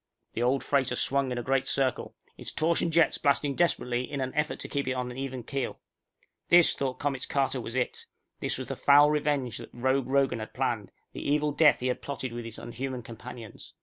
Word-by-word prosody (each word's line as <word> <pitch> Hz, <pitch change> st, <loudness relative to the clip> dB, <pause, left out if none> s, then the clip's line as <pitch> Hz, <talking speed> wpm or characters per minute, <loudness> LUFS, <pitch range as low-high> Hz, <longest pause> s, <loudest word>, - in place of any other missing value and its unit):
_The 115 Hz, -, 0 dB
old 130 Hz, +2 st, +2 dB
freighter 140 Hz, -3 st, +1 dB
swung 140 Hz, -1 st, +1 dB
a 120 Hz, -1 st, -2 dB
great 135 Hz, +1 st, +1 dB
circle, 135 Hz, -2 st, 0 dB, 0.2 s
its -, -, -7 dB
torsion 165 Hz, +1 st, +1 dB
jets 165 Hz, 0 st, +3 dB
blasting 140 Hz, 0 st, +2 dB
desperately 125 Hz, -6 st, 0 dB
in 140 Hz, -, -3 dB
an 130 Hz, -1 st, -2 dB
effort 150 Hz, +1 st, 0 dB
to -, -, -5 dB
keep 140 Hz, -2 st, -2 dB
it 130 Hz, -, +1 dB
on 125 Hz, -1 st, -3 dB
an 125 Hz, -, -9 dB
even 130 Hz, -2 st, -4 dB
keel. 135 Hz, +2 st, -4 dB, 0.7 s
This, 175 Hz, -1 st, +7 dB
thought 130 Hz, -2 st, -3 dB
Comets 140 Hz, -3 st, -2 dB
Carter, 135 Hz, -2 st, 0 dB
was 115 Hz, +1 st, -6 dB
it. 125 Hz, -1 st, -2 dB, 0.3 s
This -, -, -1 dB
was -, -, -6 dB
the -, -, -3 dB
foul 145 Hz, +1 st, +6 dB
revenge 145 Hz, -5 st, 0 dB
that -, -, -9 dB
Rogue 130 Hz, +1 st, 0 dB
Rogan 135 Hz, -3 st, +2 dB
had 110 Hz, -, -8 dB
planned, -, -, -1 dB, 0.2 s
the -, -, -6 dB
evil 150 Hz, +1 st, +1 dB
death 150 Hz, -1 st, +4 dB
he -, -, -3 dB
had 125 Hz, -1 st, -1 dB
plotted 130 Hz, -3 st, -5 dB
with 120 Hz, -1 st, -5 dB
his 115 Hz, -1 st, -6 dB
unhuman 125 Hz, +1 st, -5 dB
companions. 115 Hz, -1 st, -10 dB
135 Hz, 210 wpm, -28 LUFS, 125-140 Hz, 0.7 s, This